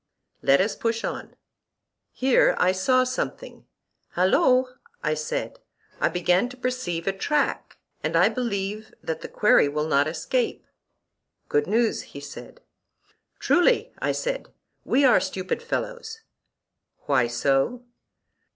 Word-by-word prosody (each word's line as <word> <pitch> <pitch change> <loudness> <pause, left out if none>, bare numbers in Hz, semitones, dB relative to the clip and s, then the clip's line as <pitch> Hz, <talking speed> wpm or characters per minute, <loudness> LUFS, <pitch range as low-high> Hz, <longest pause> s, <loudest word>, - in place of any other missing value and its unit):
Let 135 +1 +4
us 200 +3 +1
push 230 0 -2
on. - - -5 0.8
Here 260 0 +3
I 180 - +3
saw 255 +8 +2
something: 255 0 -5 0.5
Halloo! 255 - +4 0.4
I 155 - +1
said, 155 0 -4 0.4
I - - +2
begin 180 +6 +1
to 250 - -12
perceive 250 -10 -3
a 195 - 0
track, 290 +10 -1 0.3
and - - -1
I - - +6
believe 215 -3 -3
that 160 -1 -4
the - - -6
quarry 210 -8 +4
will 150 +1 -1
not 145 -2 +2
escape. 170 +10 -2 0.8
Good 440 -1 +1
news, 230 +1 +1
he - - -11
said. - - -11 0.8
Truly, 415 +8 +2
I - - 0
said, - - -3 0.3
we 275 +1 +3
are 250 - +6
stupid 185 - -3
fellows. 470 -1 -4 0.8
Why 125 -2 +2
so? 135 - 0
220 Hz, 125 wpm, -25 LUFS, 170-255 Hz, 0.8 s, I